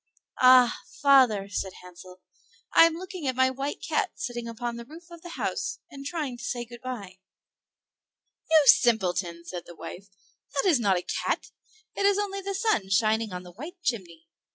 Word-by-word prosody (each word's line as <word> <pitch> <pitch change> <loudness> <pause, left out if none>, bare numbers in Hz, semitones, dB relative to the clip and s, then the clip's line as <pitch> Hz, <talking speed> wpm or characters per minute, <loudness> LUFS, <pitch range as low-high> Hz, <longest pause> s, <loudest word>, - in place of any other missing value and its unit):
"Ah! 255 -1 +7 0.2
father," 255 -8 +5
said 190 -1 -4
Hansel, 180 +1 -14 0.5
"I - - +8
am 330 -1 +1
looking 365 -3 -6
at 260 - 0
my 260 0 +3
white 275 +2 -5
cat 430 -4 0
sitting 240 -2 -5
upon 235 +1 -4
the 235 0 -8
roof 335 +5 -14
of 340 -1 -11
the 350 0 -9
house, - - -2
and 275 -1 -9
trying 290 -7 -4
to - - -10
say 240 -1 -3
good 240 0 -12
by." 205 -8 -7 1.3
"You 315 -1 +6
simpleton!" 180 -9 +3
said 175 0 -7
the 175 - -11
wife, 190 +4 -9 0.5
"that 275 - +1
is 320 -8 +4
not 200 -5 +2
a 180 - -3
cat; - - -2 0.4
it 400 - +2
is 405 -1 +3
only 395 -1 -2
the 395 0 -4
sun 390 - 0
shining 215 +2 +2
on 180 0 -6
the 180 - -12
white 315 - -9
chimney." 170 - -3
245 Hz, 180 wpm, -27 LUFS, 195-310 Hz, 1.3 s, I